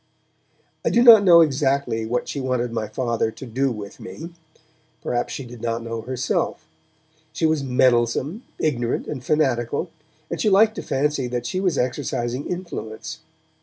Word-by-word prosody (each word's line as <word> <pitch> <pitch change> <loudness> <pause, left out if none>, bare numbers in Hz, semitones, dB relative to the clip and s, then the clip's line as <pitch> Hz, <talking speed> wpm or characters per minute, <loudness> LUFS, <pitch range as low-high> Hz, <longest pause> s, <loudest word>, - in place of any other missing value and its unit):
I - - +2
do 235 - +4
not 225 -4 +9
know 170 -3 +8
exactly 135 -6 +1
what 125 +2 -1
she 140 - -4
wanted 125 -2 -1
my 110 -2 -2
Father 115 0 -1
to 120 - -10
do 130 +3 0
with 105 -1 -8
me; 155 +9 -9 0.7
perhaps 120 0 -1
she 135 - -5
did 120 -1 -11
not 115 0 -2
know 115 -1 -4
herself; 125 +2 -2 0.7
she 165 - 0
was 160 -2 +2
meddlesome, 130 - +2 0.2
ignorant 120 -6 -1
and 130 -4 -6
fanatical, 130 -6 0 0.4
and - - -2
she 215 - +3
liked 215 +3 +5
to - - -2
fancy 140 -1 -1
that 120 0 -3
she 185 +10 -2
was 185 -5 0
exercising 125 0 -2
influence. 175 -12 -6
130 Hz, 160 wpm, -23 LUFS, 120-155 Hz, 0.7 s, not